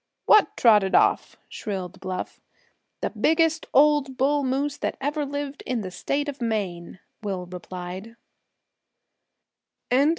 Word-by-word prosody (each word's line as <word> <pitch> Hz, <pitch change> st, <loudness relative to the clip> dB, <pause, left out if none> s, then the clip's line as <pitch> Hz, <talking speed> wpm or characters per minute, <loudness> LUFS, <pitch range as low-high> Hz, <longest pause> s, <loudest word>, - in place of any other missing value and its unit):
"What 425 Hz, 0 st, +5 dB
trotted 210 Hz, -5 st, +5 dB
off?" -, -, +3 dB
shrilled 190 Hz, -2 st, -5 dB
Bluff. 185 Hz, -1 st, -5 dB, 0.6 s
"The -, -, -1 dB
biggest 320 Hz, 0 st, +2 dB
old 285 Hz, -2 st, +4 dB
bull 285 Hz, +2 st, +2 dB
moose 275 Hz, +2 st, -1 dB
that -, -, -3 dB
ever 290 Hz, +1 st, -2 dB
lived 285 Hz, 0 st, -5 dB
in 245 Hz, -3 st, -1 dB
the 185 Hz, -2 st, -6 dB
State 285 Hz, +10 st, -2 dB
of 280 Hz, -2 st, -6 dB
Maine," 195 Hz, -7 st, -3 dB, 0.2 s
Will 195 Hz, -4 st, -3 dB
replied. 180 Hz, +4 st, -8 dB
250 Hz, 120 wpm, -25 LUFS, 190-290 Hz, 0.6 s, What